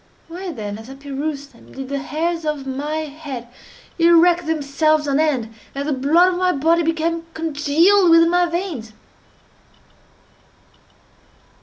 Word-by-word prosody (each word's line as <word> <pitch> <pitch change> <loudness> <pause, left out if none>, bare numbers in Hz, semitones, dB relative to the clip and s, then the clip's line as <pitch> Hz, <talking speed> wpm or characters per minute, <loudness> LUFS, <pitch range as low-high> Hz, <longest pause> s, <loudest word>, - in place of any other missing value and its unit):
Why 355 +2 -6
then, 210 -6 -6
as 225 +3 -12
I 270 - -9
perused 280 +1 -5
them, 235 - -18
did 265 0 -7
the 280 0 -2
hairs 330 +4 -2
of 300 -3 -3
my 290 +4 -3
head 285 -5 -7 0.5
erect 340 0 +4
themselves 310 0 +1
on 280 +1 +1
end, 260 -8 0 0.2
and 280 +1 -3
the 300 - 0
blood 325 +8 +3
of 355 - -3
my 365 0 +2
body 325 +4 +2
become 330 0 -1
congealed 325 +5 +3
within 330 0 +6
my 355 0 +3
veins? 335 - -4
310 Hz, 140 wpm, -20 LUFS, 275-335 Hz, 0.5 s, within